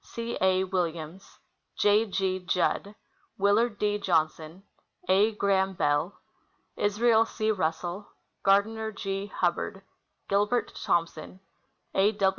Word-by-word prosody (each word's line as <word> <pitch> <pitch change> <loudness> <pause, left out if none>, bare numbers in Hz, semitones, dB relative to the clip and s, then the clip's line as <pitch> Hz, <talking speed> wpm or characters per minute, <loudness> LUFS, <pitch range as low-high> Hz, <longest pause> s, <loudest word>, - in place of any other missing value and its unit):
C. 235 0 -5
A. 190 0 +3
Williams. 175 -1 -4 0.4
J. 210 +2 +3
G. 190 -1 -1
Judd. 185 +3 -1 0.4
Willard 210 +3 +2
D. 210 0 0
Johnson. 160 -1 -1 0.4
A. 200 +4 +4
Graham 195 -2 +1
Bell. 145 +3 0 0.6
Israel 220 +2 +3
C. 220 -1 -1
Russell. 180 +1 -2 0.3
Gardiner 220 +3 +2
G. 195 -1 -4
Hubbard. 195 +1 -2 0.4
Gilbert 205 +4 +1
Thompson. 170 +1 -2 0.5
A. 205 +2 +2
195 Hz, 100 wpm, -27 LUFS, 180-210 Hz, 0.6 s, A